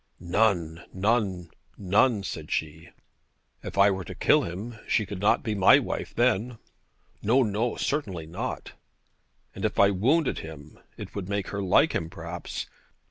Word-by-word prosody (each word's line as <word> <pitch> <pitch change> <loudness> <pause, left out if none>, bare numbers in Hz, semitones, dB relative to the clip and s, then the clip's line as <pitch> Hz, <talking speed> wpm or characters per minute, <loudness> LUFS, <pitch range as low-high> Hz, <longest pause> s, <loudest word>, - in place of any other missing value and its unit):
'None, 85 -3 +1
none, 95 -3 0 0.3
none,' 100 +3 +2
said 80 -4 -6
she. 80 +2 -3 0.7
'If - - -7
I 100 +1 +6
were 95 -1 -3
to - - -8
kill - - +4
him, 105 +7 -6
she 110 - +2
could 100 0 -7
not 105 +2 +2
be 110 - -1
my 100 -3 +6
wife - - -4
then.' 120 0 +1 0.6
'No, 125 +6 +3
no; 110 +2 -1
certainly 100 - -2
not.' 80 +2 -5 0.8
'And - - -8
if - - -1
I 100 0 +6
wounded 135 - +1
him, 75 -2 -11 0.2
it - - -8
would 100 -2 -5
make 100 -1 -2
her 100 - -3
like 95 -2 +3
him 80 - -2
perhaps. - - -6
100 Hz, 155 wpm, -27 LUFS, 85-110 Hz, 0.8 s, I